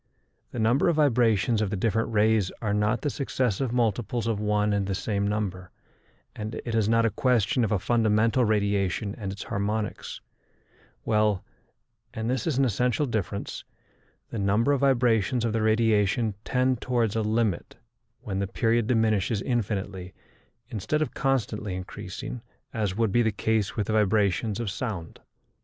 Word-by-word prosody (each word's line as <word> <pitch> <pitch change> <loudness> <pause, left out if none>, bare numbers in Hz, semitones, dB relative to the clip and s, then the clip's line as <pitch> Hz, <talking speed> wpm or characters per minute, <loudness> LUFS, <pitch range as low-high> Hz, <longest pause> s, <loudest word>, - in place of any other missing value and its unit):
The - - -8
number 120 +8 +3
of 170 - +2
vibrations 120 -6 +3
of 105 - 0
the 105 - -2
different 115 +3 0
rays 110 -2 +2
are 105 -3 -1
not 105 +3 +1
the 145 - +1
successive 130 -3 -1
multiples 120 -1 0
of 115 -3 0
one 105 0 +1
and 100 -1 0
the 95 - -1
same 100 0 -1
number, 95 -3 -3 0.7
and 110 +1 -5
it 120 - -3
is 110 -2 +2
not 115 0 +3
a 115 - +2
question 125 0 +2
of 110 - 0
a 105 - +3
fundamental 115 +3 +2
radiation 100 -2 0
and 100 -3 -5
its 100 - -6
harmonics, 105 +1 -3 0.8
while 105 -3 +1 0.7
and 110 +2 -2
this 130 +1 -1
is 150 -6 0
an 135 - +4
essential 125 +5 +1
difference 105 -5 -3 0.7
the 115 - -3
number 105 +7 +2
of 140 - +2
vibrations 120 -3 +2
of 115 - 0
the 115 - 0
radiation 110 -1 +2
tend 130 -1 +1
towards 120 -4 0
a 110 - +1
limit 110 -4 -1 0.5
when 95 -2 -3
the 100 - -1
period 115 +2 +1
diminishes 110 -3 +1
infinitely 100 -6 -3 0.5
instead 130 +8 -1
of - - -6
constantly 110 -7 -1
increasing, 95 +5 -7 0.3
as 105 -4 -1
would 115 -3 +1
be 120 - +3
the 110 -2 +2
case 110 0 0
with 105 - -1
the 110 - -2
vibrations 105 0 +1
of 115 -5 -2
sound. 100 -7 -5
110 Hz, 160 wpm, -26 LUFS, 100-120 Hz, 0.8 s, an